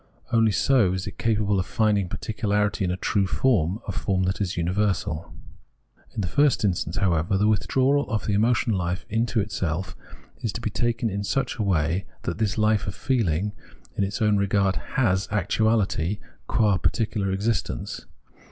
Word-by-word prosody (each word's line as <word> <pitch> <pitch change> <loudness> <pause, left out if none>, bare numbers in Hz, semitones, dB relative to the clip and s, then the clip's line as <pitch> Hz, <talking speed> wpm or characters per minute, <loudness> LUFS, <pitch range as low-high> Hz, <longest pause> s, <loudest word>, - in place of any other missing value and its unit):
Only 115 -1 +4
so 110 -4 +3
is 95 0 -3
it - - -8
capable 105 -3 +1
of 90 - -1
finding 105 -4 +1
particularity 105 -1 -1
in 90 - 0
a 90 - -1
true 100 0 +1
form, 100 -4 +1
a - - -1
form 95 -2 0
that 95 +2 -1
is 95 -2 -1
imiversal. 90 -3 -1 0.8
In - - -1
the 95 - -2
first 140 - +3
instance, 85 -3 -1
however, 90 -1 +1
the 105 +2 +2
withdrawal 130 +6 +2
of 110 -4 -1
the 105 - 0
emotional 110 -1 +2
hfe 90 +2 -2
into 115 0 +1
itself 95 -2 -3 0.5
is 115 - -1
to 115 - -5
be 110 - -2
taken 115 0 0
in 100 +1 -3
such 135 +7 -1
a - - -2
way 90 -1 +1 0.2
that 85 - -3
this 110 -2 0
hfe 110 -2 +2
of 95 - -4
feehng, 105 - 0 0.4
in - - +1
its 100 +3 -2
own 105 -1 +3
regard, 100 -1 +2 0.2
has 95 -7 +2
actuahty 105 -2 +1 0.3
qua 105 -4 +3
particular 105 -4 0
existence. 105 +4 -2
100 Hz, 170 wpm, -25 LUFS, 95-110 Hz, 0.8 s, Only